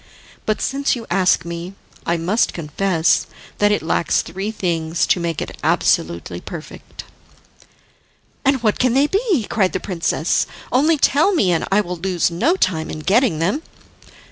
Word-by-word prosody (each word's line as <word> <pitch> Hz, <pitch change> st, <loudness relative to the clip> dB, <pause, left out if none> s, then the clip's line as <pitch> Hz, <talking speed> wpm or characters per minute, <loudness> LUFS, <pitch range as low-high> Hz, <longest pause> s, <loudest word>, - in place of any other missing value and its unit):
But 215 Hz, -, 0 dB
since 275 Hz, +1 st, 0 dB
you 235 Hz, -2 st, -7 dB
ask 180 Hz, -2 st, +2 dB
me, 170 Hz, +3 st, -6 dB, 0.3 s
I 170 Hz, -, +1 dB
must 185 Hz, +8 st, +1 dB
confess 165 Hz, +1 st, +1 dB, 0.3 s
that 205 Hz, 0 st, +4 dB
it 210 Hz, -, 0 dB
lacks 165 Hz, -, +1 dB
three 195 Hz, +4 st, -5 dB
things 170 Hz, -5 st, -1 dB
to -, -, +2 dB
make 170 Hz, -2 st, -2 dB
it -, -, -9 dB
absolutely 85 Hz, +1 st, 0 dB
perfect." 165 Hz, -3 st, -9 dB, 1.4 s
"And 270 Hz, -3 st, +2 dB
what 215 Hz, -2 st, +1 dB
can 255 Hz, -1 st, +2 dB
they 275 Hz, +2 st, +5 dB
be?" 390 Hz, -, +1 dB
cried 190 Hz, -4 st, +1 dB
the -, -, -1 dB
princess. 170 Hz, -3 st, 0 dB, 0.2 s
"Only 300 Hz, +6 st, +3 dB
tell 315 Hz, +7 st, +3 dB
me, 195 Hz, -, +3 dB
and 165 Hz, -, 0 dB
I 200 Hz, +2 st, +4 dB
will 180 Hz, -2 st, -5 dB
lose 175 Hz, -1 st, 0 dB
no 290 Hz, -, +2 dB
time 170 Hz, -, 0 dB
in 155 Hz, -, -6 dB
getting 200 Hz, -, +2 dB
them." 185 Hz, -, 0 dB
190 Hz, 160 wpm, -20 LUFS, 170-245 Hz, 1.4 s, they